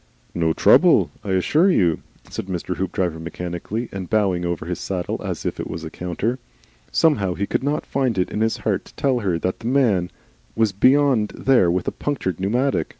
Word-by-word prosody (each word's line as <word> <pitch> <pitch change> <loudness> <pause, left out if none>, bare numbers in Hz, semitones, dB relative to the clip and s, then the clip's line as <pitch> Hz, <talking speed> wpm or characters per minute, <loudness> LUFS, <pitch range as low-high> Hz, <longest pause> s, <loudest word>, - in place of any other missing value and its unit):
"No 80 -2 +1
trouble. - - +5
'Ssure 100 - +2
you," 90 - +2 0.3
said - - -6
Mr. 90 -1 -3
Hoopdriver, 90 -3 -2
mechanically 90 +7 -5
and 95 -2 -6
bowing 95 -5 +1
over 85 -2 -3
his 90 0 -4
saddle 90 -2 -3
as - - -4
if - - -3
it - - -4
was 80 +1 -5
a 80 - -6
counter. 100 +8 -3 0.5
Somehow 100 - +2
he 100 - -1
could - - -2
not 145 +2 -1
find 130 -6 -1
it 90 - 0
in 105 - -2
his 110 0 +1
heart - - 0
to - - -17
tell 135 -3 +1
her 95 -6 0
that 90 +3 -2
the 115 - -6
man 115 -10 +2 0.5
was 110 -2 +2
beyond 130 +1 +3
there 130 -10 +4
with 90 +1 -1
a - - +1
punctured 110 - -3
pneumatic. 115 - 0
95 Hz, 190 wpm, -22 LUFS, 90-125 Hz, 0.5 s, trouble